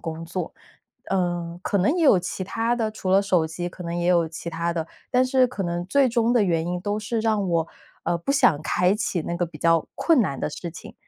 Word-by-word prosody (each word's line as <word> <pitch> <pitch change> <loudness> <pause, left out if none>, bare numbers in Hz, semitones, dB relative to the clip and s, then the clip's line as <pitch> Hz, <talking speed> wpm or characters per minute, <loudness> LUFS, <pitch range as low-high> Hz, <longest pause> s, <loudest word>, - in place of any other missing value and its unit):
工 165 0 -5
作。 180 +2 -5 0.6
嗯， 175 -2 -1
可 200 - 0
能 205 - +2
也 340 - +2
有 240 -10 +6
其 180 +1 -4
它 230 +4 0
的 225 -2 -1
除 205 -3 -4
了 195 +1 +6
手 185 -5 +2
机 175 +3 -4
可 180 - -10
能 170 0 -4
也 175 0 -1
有 170 -2 +3
其 165 +1 -7
它 170 +1 -2
的， 165 -2 -3 0.2
但 250 +1 +4
是 255 0 +3
可 240 -5 -5
能 175 -1 -2
最 270 +6 +3
终 235 0 +2
的 240 -4 +4
原 165 -3 +1
因 180 0 -2
都 205 +2 -2
是 225 +2 -2
让 215 -3 +1
我， 165 -2 +1 0.4
呃， 175 - +1
不 170 - -3
想 180 - +4
开 180 +4 +2
启 210 -5 -1
那 170 - -3
个 175 - 0
比 160 -2 -10
较 165 0 +3
困 330 -6 +3
难 140 - -1
的 - - -2
事 170 +3 -6
情， 165 - -11
180 Hz, 260 characters per minute, -24 LUFS, 170-215 Hz, 0.6 s, 有